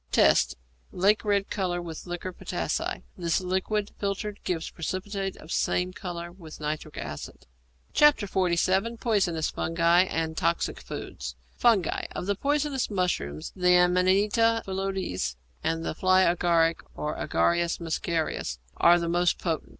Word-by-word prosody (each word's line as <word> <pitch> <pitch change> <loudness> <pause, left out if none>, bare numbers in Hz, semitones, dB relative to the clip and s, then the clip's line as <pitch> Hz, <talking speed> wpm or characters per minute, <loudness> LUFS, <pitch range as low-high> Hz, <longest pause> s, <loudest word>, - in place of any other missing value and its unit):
Tests. - - +4 0.4
Lake 200 +4 +3
red 200 -2 +1
colour 180 -3 -1
with 170 0 -7
liquor 175 +1 -4
potassæ; - - -3
this 170 -3 0
liquid 190 +3 -1
filtered 200 +1 -3
gives 165 -3 -2
a - - -22
precipitate 195 +3 -3
of 160 - -12
same 180 +1 0
colour 175 -2 -6
with 170 -4 -12
nitric 155 0 -4
acid. 75 -1 -7 0.5
XLVII. 195 -5 +3
POISONOUS 185 -9 +1
FUNGI 170 +2 +3
AND 160 -2 -2
TOXIC 85 - 0
FOODS 65 0 -6 0.2
=Fungi.= 225 -7 +2
Of - - -4
the 200 - +1
poisonous 285 +2 0
mushrooms, 180 - -2
the 180 -1 +4
Amanita 200 +6 +3
phalloides 190 - -2 0.3
and 165 0 -1
the - - -1
fly 185 +3 +4
agaric, 170 -2 +3 0.2
or 150 - -3
Agaricus 170 0 +1
muscarius, 160 - -2 0.2
are 170 +1 +6
the 170 -1 -2
most 175 +1 +2
potent. 165 -4 -2
180 Hz, 135 wpm, -27 LUFS, 165-195 Hz, 0.5 s, are